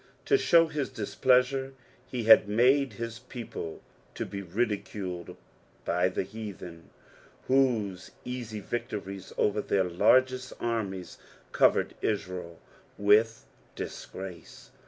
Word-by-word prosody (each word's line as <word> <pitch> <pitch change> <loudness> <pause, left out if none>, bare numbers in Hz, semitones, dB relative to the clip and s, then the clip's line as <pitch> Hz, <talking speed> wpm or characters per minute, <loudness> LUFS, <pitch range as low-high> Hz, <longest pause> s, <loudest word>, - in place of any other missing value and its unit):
To 415 - +4
show 170 - +5
his 150 -3 -3
dispUnsure 130 +4 +1 0.4
oe 125 -2 -2
had 110 -2 +7
made 130 +5 +3
his 115 -1 -6
people 115 -10 -7 0.3
to - - -3
be 100 - -6
ndiculed 95 -2 -3 0.5
bj 90 +1 +1
the - - +1
heatheti, 100 -5 -8 0.6
whose 115 -8 +1 0.2
easy 120 -4 -5
victories 100 -4 -5
over 105 0 +2
their 100 -2 +1
largest 125 +8 +3
annies 100 -7 -3 0.3
covered - - +3
Israel 90 -5 -3 0.4
with 110 +3 +3 0.3
disgrace. 95 -2 -8
110 Hz, 105 wpm, -29 LUFS, 95-125 Hz, 0.6 s, had